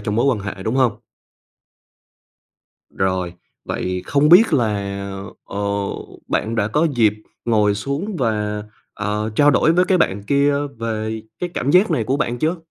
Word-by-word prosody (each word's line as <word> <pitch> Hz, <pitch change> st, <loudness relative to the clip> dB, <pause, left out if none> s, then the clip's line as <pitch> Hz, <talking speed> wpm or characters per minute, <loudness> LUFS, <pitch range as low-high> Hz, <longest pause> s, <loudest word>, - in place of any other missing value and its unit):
trong 105 Hz, 0 st, -2 dB
mối 120 Hz, -, +2 dB
quan 135 Hz, -5 st, +2 dB
hệ, 95 Hz, -1 st, -6 dB
đúng 110 Hz, +5 st, -1 dB
hông? 130 Hz, -5 st, +2 dB, 1.9 s
Rồi, 95 Hz, -2 st, -1 dB, 0.3 s
vậy 90 Hz, 0 st, -3 dB
không 145 Hz, +1 st, +3 dB
biết 180 Hz, +2 st, +7 dB
là, 120 Hz, -6 st, +2 dB, 0.8 s
ờ, 100 Hz, -, -7 dB, 0.7 s
bạn 110 Hz, +2 st, -1 dB
đã 105 Hz, -2 st, +1 dB
có 150 Hz, +8 st, +2 dB
dịp 110 Hz, -4 st, +4 dB, 0.3 s
ngồi 105 Hz, -3 st, +3 dB
xuống 140 Hz, -, -3 dB
và, 105 Hz, -5 st, -1 dB, 0.3 s
ờ, 105 Hz, +1 st, -2 dB
trao 145 Hz, 0 st, +6 dB
đổi 150 Hz, +4 st, +3 dB
với 180 Hz, +2 st, +4 dB
cái 185 Hz, 0 st, +2 dB
bạn 100 Hz, -, +1 dB
kia 140 Hz, +6 st, +2 dB, 0.2 s
về 110 Hz, -1 st, -3 dB, 0.2 s
cái 180 Hz, -, -3 dB
cảm 140 Hz, -, 0 dB
giác 185 Hz, +6 st, +5 dB
này 115 Hz, -, +1 dB
của 130 Hz, +5 st, 0 dB
bạn 120 Hz, -4 st, -1 dB
chưa? 160 Hz, +7 st, 0 dB
115 Hz, 160 wpm, -20 LUFS, 105-145 Hz, 1.9 s, biết